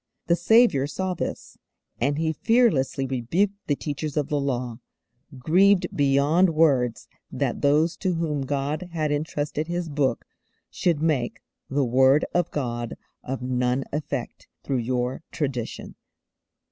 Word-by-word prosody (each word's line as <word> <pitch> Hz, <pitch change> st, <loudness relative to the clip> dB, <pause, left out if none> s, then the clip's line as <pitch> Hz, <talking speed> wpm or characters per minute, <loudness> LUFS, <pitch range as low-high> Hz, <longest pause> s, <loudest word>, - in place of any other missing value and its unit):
The 170 Hz, -, +3 dB
Saviour 175 Hz, -, +4 dB
saw 185 Hz, +5 st, -2 dB
this, 175 Hz, -, -6 dB, 0.4 s
and 145 Hz, +1 st, +1 dB
He 160 Hz, 0 st, 0 dB
fearlessly 155 Hz, -, +2 dB
rebuked 135 Hz, -, 0 dB
the 145 Hz, -, +2 dB
teachers 150 Hz, +1 st, -4 dB
of 145 Hz, -2 st, 0 dB
the 145 Hz, -, 0 dB
Law, 125 Hz, -3 st, -2 dB, 0.6 s
grieved 185 Hz, +8 st, +3 dB
beyond 145 Hz, +5 st, +3 dB
words 135 Hz, -7 st, +2 dB, 0.2 s
that -, -, -2 dB
those 150 Hz, +4 st, +3 dB
to 185 Hz, -3 st, -1 dB
whom 155 Hz, -4 st, -1 dB
God 145 Hz, +5 st, -2 dB
had 155 Hz, -3 st, -1 dB
entrusted 150 Hz, +1 st, -2 dB
His 175 Hz, -1 st, -3 dB
Book 140 Hz, -4 st, 0 dB, 0.5 s
should 165 Hz, -4 st, 0 dB
make 140 Hz, -7 st, 0 dB, 0.3 s
'_the 135 Hz, -1 st, +1 dB
Word 130 Hz, +4 st, +4 dB
of 175 Hz, -2 st, +1 dB
God 120 Hz, -4 st, -3 dB, 0.3 s
of 130 Hz, 0 st, -4 dB
none 125 Hz, +1 st, 0 dB
effect 145 Hz, -4 st, -4 dB, 0.2 s
through 135 Hz, -2 st, -1 dB
your 125 Hz, +2 st, -2 dB
tradition. 135 Hz, -7 st, -4 dB
145 Hz, 135 wpm, -25 LUFS, 130-165 Hz, 0.6 s, Saviour